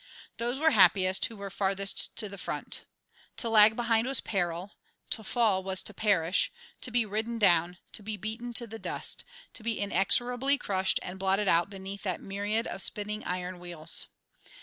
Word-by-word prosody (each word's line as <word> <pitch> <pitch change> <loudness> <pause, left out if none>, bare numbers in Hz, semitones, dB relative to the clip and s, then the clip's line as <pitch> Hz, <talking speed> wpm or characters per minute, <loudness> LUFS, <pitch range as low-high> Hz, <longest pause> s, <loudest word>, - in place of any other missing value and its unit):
Those 240 +2 -1
were 320 +2 +3
happiest 185 - +4
who 225 - -12
were 200 -1 -6
farthest 195 0 0
to 215 - 0
the 200 -1 -9
front. - - -3 0.5
To 235 - 0
lag 215 0 +7
behind 230 0 +1
was 270 - +2
peril; 180 -1 -2 0.4
to 220 - -2
fall 210 -4 +2
was 190 0 +1
to 210 - -1
perish, 190 -4 +2 0.3
to - - -1
be 240 -1 +1
ridden 220 +3 -2
down, 175 -4 +4
to - - -3
be 210 +1 -4
beaten 225 +4 -5
to 235 - 0
the 225 0 -9
dust, - - -3 0.3
to - - -5
be 225 0 -2
inexorably 245 +7 +2
crushed 190 -6 +1
and 185 +1 -7
blotted 195 +2 +1
out 170 +2 +3
beneath 195 0 -8
that 185 -4 -2
myriad 205 +3 -2
of 195 - -5
spinning 210 +1 +1
iron 180 0 -4
wheels. 175 -3 -3
200 Hz, 175 wpm, -29 LUFS, 190-225 Hz, 0.5 s, lag